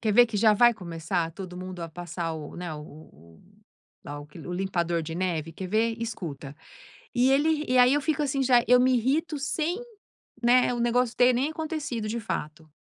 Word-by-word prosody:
quer 215 -3 +1
ver 245 +3 +7
que 225 -2 -4
já 215 +1 +5
vai 240 +3 +6
começar 170 -2 -3
todo 180 0 -8
mundo 185 0 -7
a 165 - -5
passar 170 0 -5
o 150 -2 -8
né, 175 -2 -5
o-o 115 - -13
o - - -24 0.6
lá 145 0 -6
o 145 - -11
que 150 +3 -14
o 175 +2 -7
limpador 175 -2 -1
de 160 +1 -6
neve? 165 -3 -2
Quer 185 +3 -6
ver? 225 +3 +1
Escuta." 160 -11 -6 0.6
E 250 +2 +4
ele 305 +2 +2
e 255 - +2
aí 250 +1 +6
eu 290 - +2
fico 300 0 0
assim, 275 -1 0
já 245 -2 +4
eu 250 0 +6
me 255 0 +4
irrito 290 +6 0
sem, 315 +6 -2 0.6
né, 245 +1 +4
o - - -4
negócio 240 0 +1
ter 250 +1 +5
nem 260 +5 0
acontecido 305 -8 -4
de 230 +2 -3
fato. 155 -6 -5
215 Hz, 205 wpm, -27 LUFS, 170-250 Hz, 0.6 s, ver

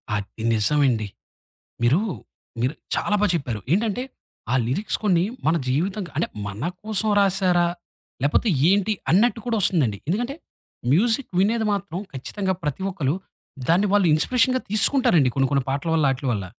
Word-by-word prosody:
అది 105 +2 -5
నిజమండి. 115 -1 +2 0.8
మీరూ 130 +10 +4 0.6
మీరు 130 +5 0 0.2
చాలా 210 - +1
బా 210 - +4
చెప్పారు. 125 -9 -2
ఏంటంటే 215 +4 +1 0.5
ఆ - - +3
లిరిక్స్ 145 - -1
కొన్ని 180 -4 +3 0.2
మన 165 +2 +3
జీవితం 185 +10 0
క - - -11
అంటే 160 - 0 0.2
మన 105 - -3
కోసం 215 0 -1
రాశారా? 185 -3 +3 0.6
లేపోతే 150 +10 +2 0.2
ఏంటి? 205 +2 +2 0.2
అన్నట్టు 225 +6 +3
కూడా 230 -2 0
వస్తుందండి. 135 - +1
ఎందుకంటే 240 +9 -1 0.6
మ్యూజిక్ 225 - +2
వినేది 220 +4 +2
మాత్రం 200 -3 -3
ఖచ్చితంగా 190 +9 -3
ప్రతి 150 +5 -3
ఒక్కళ్ళు 155 -6 -1 0.5
దాన్ని 185 +5 +4
వాళ్ళు 205 -3 +4
ఇన్స్‌పిరేషన్‌గా 255 +9 +2
తీసుకుంటారండి 215 - +3
కొన్ని 135 -1 +2
కొన్ని 140 -2 +2
పాటల 140 +4 -2
వల్ల, 155 -3 +3
ఆటిల 135 +1 -5
వల్ల. 100 -3 -2
175 Hz, 145 wpm, -23 LUFS, 140-210 Hz, 0.8 s, మీరూ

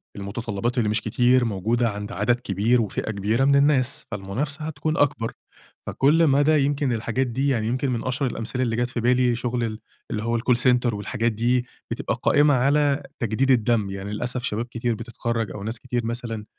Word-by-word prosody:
المتطلبات 110 +3 -3
اللي 110 -3 +2
مش 105 - +1
كتير 125 +3 +3
موجودة 115 +3 0
عند 105 +2 -6
عدد 120 0 +1
كبير 115 +3 +1
وفئة 110 +1 -3
كبيرة 110 +6 +1
من 140 0 +4
الناس، 140 -2 +2
فالمنافسة 130 +10 -3
هتكون 155 +1 -2
أكبر، 120 -5 +1 0.5
فكل 155 +4 +3
مدى 145 +2 +4
يمكن 140 -3 0
الحاجات 115 +3 -1
دي 135 +4 -1
يعني 115 -5 +1
يمكن 130 +3 -1
من 115 - -2
اشهر 130 +1 -1
الأمثلة 115 +3 -3
اللي 115 -2 0
جات 120 +1 0
في 120 - -4
بالي 125 +1 +3
هى - - 0
شغل 120 0 -2
ال 110 -1 -3 0.3
اللى 105 0 -2
هو 115 0 0
الcall 125 +1 +2
center، 125 -1 +3
والحاجات 110 +3 -1
دي 120 +3 +1 0.3
بتبقى - - -2
قائمة 145 0 +4
على 140 +2 +2 0.2
تجديد 125 +2 +1
الدم، 115 -4 +2
يعني 100 +1 -5
للأسف 125 +3 -2
شباب 115 -3 -2
كتير 120 -1 -2
بتتخرج 115 -2 -3
أو 100 - -7
ناس 110 +2 -4
كتير 120 -2 -3
مثلًا 115 -2 -4
120 Hz, 190 wpm, -24 LUFS, 110-130 Hz, 0.5 s, من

